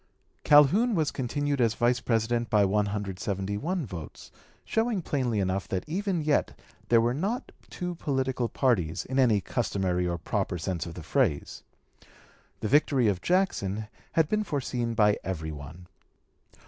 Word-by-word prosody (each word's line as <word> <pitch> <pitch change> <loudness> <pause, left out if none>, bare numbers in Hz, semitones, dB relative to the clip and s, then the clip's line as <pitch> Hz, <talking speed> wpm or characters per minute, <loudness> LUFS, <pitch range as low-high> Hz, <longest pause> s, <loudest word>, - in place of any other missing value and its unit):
Calhoun 185 - +5
was 155 -4 +1
continued 140 +2 -1
as 115 -2 +2
Vice 120 0 +2
President 115 +1 0
by 105 -2 +4
171 100 - -2
votes, 85 -7 -9 0.3
showing 225 -4 0
plainly 125 -8 0
enough 95 -1 -1
that 95 - -2
even 185 0 -1
yet 150 -1 +1 0.3
there 115 - +6
were 120 +1 +2
not 205 - -2 0.2
two 180 0 -4
political 130 -6 -1
parties, 90 - 0
in 130 +1 -1
any 115 -6 +4
customary 95 -6 -1
or 85 -1 -1
proper 95 +2 -2
sense 85 0 -3
of 85 - -8
the 85 - -8
phrase. 95 - 0 1.0
The - - -1
victory 135 -2 +3
of 95 -3 -1
Jackson 110 - 0 0.2
had 160 -2 +3
been 215 +5 0
foreseen 125 - -2
by 105 -1 +3
every 80 -4 -4
one. 75 +4 -10
115 Hz, 145 wpm, -28 LUFS, 95-145 Hz, 1.0 s, there